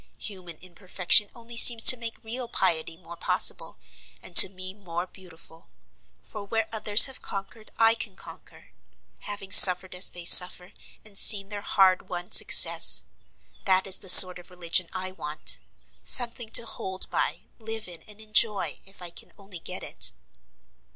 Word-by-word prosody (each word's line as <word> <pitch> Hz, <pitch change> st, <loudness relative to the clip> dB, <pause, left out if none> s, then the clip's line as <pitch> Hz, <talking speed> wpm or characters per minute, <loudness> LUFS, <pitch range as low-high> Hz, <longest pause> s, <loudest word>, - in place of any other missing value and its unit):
Human 180 Hz, -5 st, -13 dB
imperfection 185 Hz, +3 st, -1 dB
only 235 Hz, 0 st, -13 dB
seems 230 Hz, -1 st, +5 dB
to -, -, +7 dB
make 230 Hz, -2 st, -10 dB
real 240 Hz, +2 st, -7 dB
piety 165 Hz, -7 st, -6 dB
more 170 Hz, -1 st, -17 dB
possible, -, -, -3 dB, 0.5 s
and -, -, -15 dB
to -, -, +8 dB
me 185 Hz, 0 st, -12 dB
more 175 Hz, -3 st, -11 dB
beautiful; 170 Hz, -3 st, -20 dB, 0.5 s
for 210 Hz, -, -14 dB
where 225 Hz, +2 st, -7 dB
others 215 Hz, -1 st, +1 dB
have 265 Hz, -1 st, -12 dB
conquered 200 Hz, +3 st, -13 dB
I 225 Hz, 0 st, 0 dB
can 220 Hz, -4 st, -10 dB
conquer, -, -, -19 dB, 0.5 s
having 205 Hz, -2 st, -13 dB
suffered 185 Hz, 0 st, +6 dB
as 180 Hz, +1 st, +2 dB
they 175 Hz, -1 st, -11 dB
suffer, 180 Hz, +1 st, +3 dB, 0.3 s
and 200 Hz, -2 st, -6 dB
seen 200 Hz, -2 st, +3 dB
their 205 Hz, -1 st, -11 dB
hard 190 Hz, -2 st, -3 dB
won 175 Hz, 0 st, -11 dB
success. -, -, +3 dB, 0.6 s
That 190 Hz, 0 st, -3 dB
is 190 Hz, -1 st, 0 dB
the 190 Hz, -, -10 dB
sort 180 Hz, 0 st, +8 dB
of 175 Hz, -, -20 dB
religion 175 Hz, -1 st, -3 dB
I 185 Hz, 0 st, -10 dB
want; 150 Hz, -4 st, -5 dB, 0.4 s
something 235 Hz, -2 st, -2 dB
to 230 Hz, -, -1 dB
hold 190 Hz, -4 st, -8 dB
by, -, -, -7 dB, 0.2 s
live 225 Hz, -1 st, -11 dB
in, 175 Hz, -2 st, -15 dB
and 210 Hz, 0 st, -16 dB
enjoy, 215 Hz, -1 st, -3 dB
if 195 Hz, -2 st, -19 dB
I 175 Hz, -, -12 dB
can -, -, -15 dB
only 195 Hz, -3 st, -16 dB
get -, -, -11 dB
it." -, -, -2 dB
195 Hz, 160 wpm, -21 LUFS, 180-220 Hz, 0.6 s, to